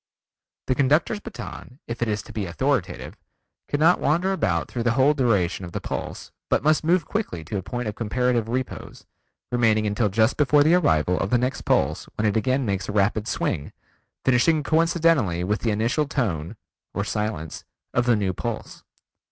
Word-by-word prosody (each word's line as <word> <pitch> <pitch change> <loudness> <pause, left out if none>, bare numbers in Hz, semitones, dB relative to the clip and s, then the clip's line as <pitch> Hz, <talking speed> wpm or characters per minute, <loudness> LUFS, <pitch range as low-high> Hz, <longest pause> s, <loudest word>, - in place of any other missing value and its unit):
The 130 - +1
conductor's 145 +10 +2
baton, 200 - -9
if 115 0 -5
it 120 - +1
is 105 0 -1
to - - -12
be 105 -4 -3
authoritative, 130 +3 -2 0.5
cannot 160 +4 +3
wander 175 +6 +1
about 85 - 0
through 120 - -4
the 120 0 +2
whole 135 +4 +4
duration 105 - +1
of 85 -1 -8
the - - -2
pulse - - -6 0.2
but - - +2
must 155 +1 +3
move 170 +1 +2
quickly 200 - -3
to 100 +6 -4
a - - -5
point 120 +5 -4
of 105 - -2
comparative 120 +1 0
repose, 130 +2 -5 0.5
remaining 110 -3 +2
until 105 +1 +1
just 110 +4 +2
before 145 0 +4
the 155 +3 +4
arrival 90 - +2
of 95 - -1
the 125 - +3
next 125 +2 -2
pulse - - +1
when 105 - -1
it 105 - +1
again 130 +4 +1
makes 100 -2 -2
a - - -1
rapid 105 +1 +1
swing, 70 - -2 0.5
finishing 145 +5 +3
coincidently 160 - +2
with 105 +3 0
the 115 - -1
initial 115 +8 0
tone 100 - -2 0.4
(or 100 - 0
silence) 105 -7 -3 0.3
of 120 0 +1
the 120 - +5
new 100 -3 0
pulse. - - -5
120 Hz, 180 wpm, -24 LUFS, 105-145 Hz, 0.5 s, the